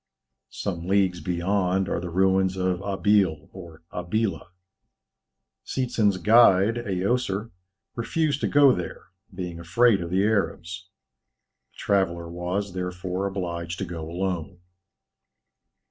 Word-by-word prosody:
Some 85 +3 -4
leagues 95 -3 +2
beyond 90 +2 0
are 85 - -1
the 90 0 -5
ruins 95 +1 +2
of 90 0 0
Abil 95 -5 +1
or 85 -4 -11
Abila. 95 +4 -2 1.2
Seetzen's 110 - 0
guide, 110 +2 +5
Aoser, 105 +1 -1 0.4
refused 145 +4 -1
to - - +1
go 145 -2 +6
there, 90 -2 -6 0.2
being 90 -3 -6
afraid 100 +4 +3
of 85 - -4
the 95 +2 +2
Arabs. 95 -3 -1 0.8
The - - -25
traveller 85 -4 0
was, 90 +3 -3
therefore, 90 +1 -3
obliged 85 -3 -4
to 100 - -3
go 80 -2 -6
alone. 90 0 -3
95 Hz, 115 wpm, -25 LUFS, 90-100 Hz, 1.2 s, go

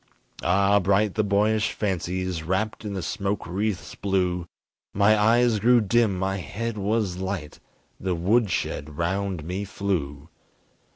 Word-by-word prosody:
Ah, 100 +3 +3
bright 100 +1 +2
the 110 - +1
boyish 105 +1 +2
fancies 90 -3 -2
Wrapped 95 +8 -2
in 105 -2 -4
the 95 - -3
smoke 95 +6 -2
wreaths 95 +2 -3
blue; 90 -3 -1 0.5
My 100 +2 +5
eyes 115 +1 +3
grew 120 +3 +5
dim, 110 -2 +2
my 95 +1 -1
head 110 +5 -4
was 105 -2 -1
light, 95 -5 -4 0.4
The 95 -1 -1
woodshed 90 -6 0
round 95 0 -1
me 90 +5 -3
flew! 80 -8 -3
100 Hz, 130 wpm, -25 LUFS, 90-105 Hz, 0.5 s, My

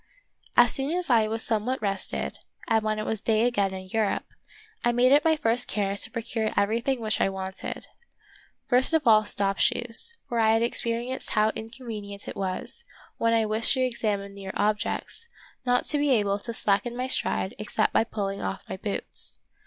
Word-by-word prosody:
As 245 -1 +7
soon 280 +6 0
as 355 -6 -2
I 225 -2 +4
was 225 +1 -1
somewhat 230 +4 0
rested, 195 -2 -3 0.3
and 225 -2 +3
when 215 0 0
it 215 - -3
was 220 -2 -2
day 220 0 +2
again 205 -6 +1
in 190 0 -7
Europe, 220 -2 0 0.6
I 240 - +3
made 245 +2 +3
it 290 +1 +6
my 320 -1 +4
first 245 -4 +2
care 200 -1 -1
to 200 - -2
procure 225 -1 -2
everything 230 +6 +1
which 215 -2 0
I - - +3
wanted. 190 0 -5 0.8
First 260 +6 +3
of 315 - +1
all 215 -2 +6
stop 195 -1 -1
shoes; 245 - +2
for 235 - -1
I 220 0 +4
had 225 +1 +2
experienced 235 +2 -2
how 215 0 +3
inconvenient 220 -4 -7
it - - -6
was, 195 - -4 0.4
when 230 0 +3
I 225 -1 +2
wished 220 +4 +4
to 260 - 0
ex 240 -2 -5
amine 200 -2 -1
near 195 -1 -7
objects, 215 - -1 0.4
not 245 0 +3
to 295 - +2
be 290 0 +1
able 205 -5 +2
to 235 - -6
slacken 230 +2 0
my 255 - -1
stride 205 -6 -1
except 210 - 0
by - - +4
pulling 200 -3 -4
off 195 - -4
my - - -5
boots. 200 +1 0
225 Hz, 190 wpm, -26 LUFS, 205-245 Hz, 0.8 s, As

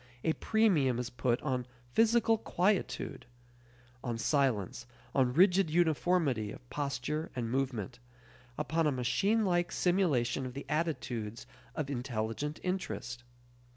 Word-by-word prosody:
A 160 - +2
premium 175 - +2
is 120 0 -3
put 120 0 0
on 125 -4 -1 0.3
physical 225 0 +4
quietude; 195 - -1 0.8
on 120 -2 -2
silence, 120 - 0 0.3
on 130 -2 +3
rigid 180 +4 +5
uniformity 160 - +2
of 125 - -12
posture 145 +2 -2
and 115 -2 -2
movement; 125 -3 -2 0.6
upon 160 +1 +1
a - - +3
machine 200 - +1
like 175 -2 +1
simulation 155 -10 +1
of 125 - -9
the 140 - -6
attitudes 125 -8 -2 0.3
of 145 -3 -2
intelligent 125 +3 -3
interest. 125 - -3
140 Hz, 120 wpm, -32 LUFS, 120-175 Hz, 0.8 s, rigid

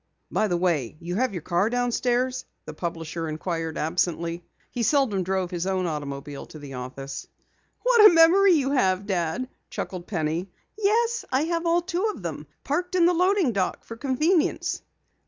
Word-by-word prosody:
"By 215 - +2
the 175 -3 0
way, 160 -8 0
you 175 +2 -4
have 255 +1 +1
your 175 -5 -5
car 175 +5 +1
downstairs?" 245 +1 0 0.2
the 155 - -7
publisher 165 0 -4
inquired 165 0 -3
absently. 170 +1 -1 0.3
He 245 - -3
seldom 235 -6 +2
drove 185 0 -1
his 175 +1 -2
own 190 -1 0
automobile 145 -3 -5
to - - -11
the 145 -2 -9
office. 130 +2 -6 0.6
"What 470 -4 +8
a - - +2
memory 350 +4 +6
you 275 -4 +2
have, 190 -8 +2
Dad!" 190 +5 -1 0.2
chuckled 180 -2 -5
Penny. 165 0 -2 0.3
"Yes, 455 +3 +1
I 260 +3 +2
have 335 +1 -1
all 340 +1 +3
two 365 +3 -1
of - - -12
them! - - -5 0.2
Parked 360 +1 -1
in 350 -2 +5
the 355 - +4
loading 365 -4 +3
dock 195 -4 -1
for 230 - -8
convenience." 295 +7 +1
195 Hz, 170 wpm, -25 LUFS, -, 0.6 s, What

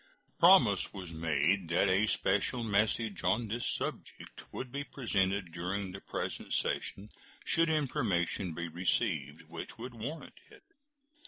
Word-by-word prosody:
Promise - - +6
was 90 -3 -7
made 80 +3 +1
that 85 +4 +3
a 95 +3 +3
special 105 +5 +1
message 110 0 +1
on 115 +3 +2
this 115 +3 -2
subject - - -7
would 125 -1 -6
be 140 +2 -3
presented 100 -9 -1
during 90 +3 -3
the 95 - -8
present - - -4
session 100 +2 -2 0.3
should 165 0 +3
information 105 - 0
be 85 +1 -3
received 80 - -1
which 80 +6 -8
would 120 +2 -7
warrant 125 +8 -7
it. - - -17
100 Hz, 135 wpm, -32 LUFS, 85-115 Hz, 0.3 s, Promise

